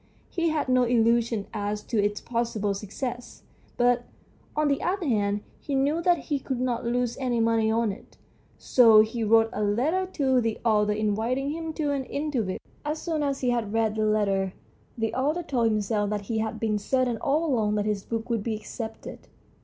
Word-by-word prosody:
He 335 -2 +1
had 310 -3 -1
no 255 0 +4
illusions 230 -2 +2
as 210 0 -3
to 215 -4 0
its 205 0 0
possible 230 -4 -1
success, 240 +5 -6 0.3
but, 245 0 +3 0.5
on 305 0 +2
the 280 -1 +1
other 370 0 -1
hand, 205 -4 +1 0.2
he 280 - -3
knew 285 +5 +1
that 350 0 +3
he 290 -3 -2
could 260 -1 -3
not 250 -1 -1
lose 240 0 -1
any 250 -3 0
money 225 -1 +2
on 225 -1 +1
it, 195 - -13 0.4
so 225 -4 +6
he 225 +1 -1
wrote 225 +1 +4
a 210 - -3
letter 285 - +1
to 265 -4 +2
the 225 -1 -1
author 210 -2 +3
inviting 220 +6 0
him 325 +1 -4
to 300 -2 -1
an 275 -2 -2
interview. 265 -11 -2 0.3
As 300 +1 -2
soon 320 -2 -2
as 280 -2 -1
he 250 -2 +2
had 225 -4 -1
read 225 -1 +2
the 215 0 0
letter 195 -3 +1 0.4
the 225 -1 -1
author 300 +7 0
told 255 -7 0
himself 210 -1 0
that 210 -1 -2
he 220 +2 -2
had 220 0 -3
been 215 -2 0
certain 250 +2 0
all 295 +8 +1
along 220 -8 +1
that 210 -1 0
his 210 -2 -1
book 225 -1 -4
would 230 -3 0
be 220 +1 -2
accepted. 220 +1 -8
230 Hz, 195 wpm, -26 LUFS, 215-270 Hz, 0.5 s, so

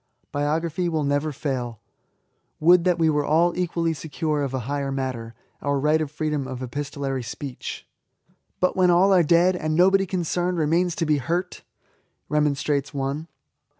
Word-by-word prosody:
Biography 160 +4 -1
will 160 -2 0
never 145 +2 0
fail. 130 -6 -4 0.8
Would 170 +2 +5
that 180 -2 +3
we 165 -1 +3
were 150 -2 +2
all 165 +4 +2
equally 170 -2 0
secure 155 0 -2
of 140 -2 -2
a 130 -1 -2
higher 140 +2 -2
matter, 130 -4 -4
— - - -41
our 140 -1 0
right 150 +3 +2
of 155 - -2
freedom 150 -2 -2
of 130 0 -6
epistolary 135 0 -3
speech! 125 +2 -7 0.7
"But 185 - +1
when 185 -1 +4
all 185 +3 +5
are 180 - +6
dead, 170 +3 +4
— - - -5
^and 155 0 -1
nobody 190 +3 +4
con 185 0 -1
cerned 175 +2 -1
remains 165 +3 +1
to 165 - -1
be 150 -1 +2
hurt?" 170 +7 -2 0.7
remonstrates 145 -1 0
one. 140 +4 -2
150 Hz, 170 wpm, -24 LUFS, 140-170 Hz, 0.8 s, are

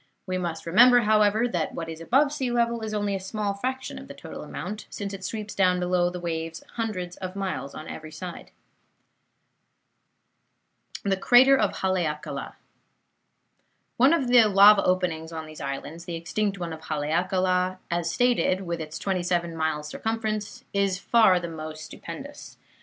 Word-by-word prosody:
We 185 -1 -2
must 170 -2 -4
remember, 245 +8 +7
however, 215 +1 +3
that 175 -8 -2
what 165 - -4
is 160 0 -7
above 275 - +3
sea 265 -4 -2
level 235 -1 +1
is 220 -1 -4
only 205 -1 -1
a 195 - -1
small 200 +1 -2
fraction 260 +6 -4
of - - -11
the - - -10
total - - -9
amount, 210 +1 -6
since 200 -1 -5
it 195 -1 -7
sweeps 210 +1 -5
down 180 -2 +3
below 180 0 +1
the 180 0 -6
waves 165 -1 -4
hundreds 185 -6 -4
of 185 0 -6
miles 185 -9 -4
on 155 - -8
every 155 0 -8
side. 175 +3 -8 2.7
CRATER 255 +6 +7
OF 210 -7 +2
HALEAKALA 150 -6 -2 1.4
Of 275 +2 +4
the 245 -2 +7
lava 205 0 +7
openings 175 -3 0
on 160 -1 -5
these 155 0 -10
islands, 145 +5 -5
the 170 - -4
extinct 200 +4 -2
one 170 -3 -4
of 160 0 -10
Haleakala, 180 +4 0
as 170 -1 0
stated, 240 -4 +2
with 170 -3 -4
its 155 0 -6
twenty 190 -2 -1
seven 175 -1 -1
miles 160 -2 -1
circumference, 220 0 -3
is 200 -2 +1
far 195 -2 +4
the 175 - -5
most 155 -1 -7
stupendous. 275 - -9
185 Hz, 160 wpm, -26 LUFS, 165-215 Hz, 2.7 s, remember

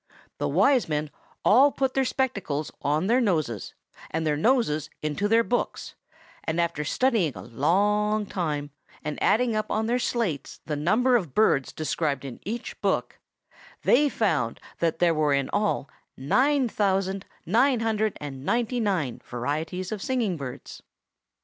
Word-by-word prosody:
The - - 0
Wise 270 - +3
Men 150 -1 -1 0.3
all 265 +7 +6
put 265 -1 -1
their 270 -1 +2
spectacles 200 - -1
on 150 +4 +1
their 240 +5 +3
noses, 155 - -1 0.3
and 160 0 -2
their 150 -1 +2
noses 155 - +1
into 155 +7 0
their 225 +2 +4
books, 245 +1 -2 0.5
and 160 +1 -1
after 170 -3 0
studying 210 - +1
a 90 - -8
long 205 - +1
time, 150 -7 -3 0.3
and 150 0 -4
adding 230 0 +3
up 215 0 -1
on 220 +1 0
their 240 +2 +1
slates 210 - -2
the 150 - -2
number 225 - +3
of 175 - -1
birds 150 -11 +3
described 150 -3 -2
in 130 -3 -7
each 230 +4 -6
book, - - -1 0.6
they 290 +3 +4
found 160 - 0 0.2
that 165 -1 +1
there 170 -1 +3
were 155 -2 +2
in 140 -1 -1
all 205 -8 0 0.3
nine 260 - +2
thousand 195 -2 0 0.2
nine 240 +5 +3
hundred 220 -2 0
and 135 -3 -7
ninety 240 - 0
nine 185 - -1
varieties 155 - -3
of 215 -2 -4
singing 235 -7 0
birds. 135 -5 -8
190 Hz, 150 wpm, -26 LUFS, 150-230 Hz, 0.6 s, all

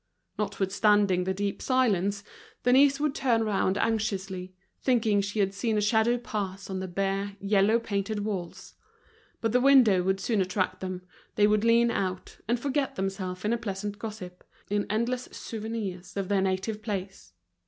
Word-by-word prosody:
Notwithstanding 200 -1 +2
the 190 - 0
deep 200 0 -2
silence, 205 -6 +1 0.4
Denise 275 +3 +5
would 300 -1 0
turn 235 -5 +1
round 195 -2 +1
anxiously, 195 -4 -2 0.3
thinking 225 -5 +2
she 200 +2 -4
had 195 0 +1
seen 220 +1 -1
a - - +3
shadow 220 +3 +3
pass 200 -5 -5
on 190 - -2
the 190 - -4
bare, 195 +2 -2
yellow 200 +2 +3
painted 205 -2 -2
walls. 185 -5 -5 0.7
But 225 - 0
the 250 +2 +3
window 250 -9 +6
would 190 +1 0
soon 215 -1 0
attract 185 0 -1
them, 185 -1 -5 0.3
they 205 - +5
would 210 0 +3
lean 235 +1 +4
out, 185 -3 -3
and 240 +1 +1
forget 280 +1 -1
themselves 190 -1 -3
in 215 - +2
a 235 - -1
pleasant 205 -1 -4
gossip, 195 -5 -7 0.3
in 205 0 0
endless 235 +4 -1
souvenirs 210 -5 -6
of 195 -1 -2
their 200 -1 +2
native 190 +3 -1
place. 195 - -5
205 Hz, 160 wpm, -28 LUFS, 190-225 Hz, 0.7 s, window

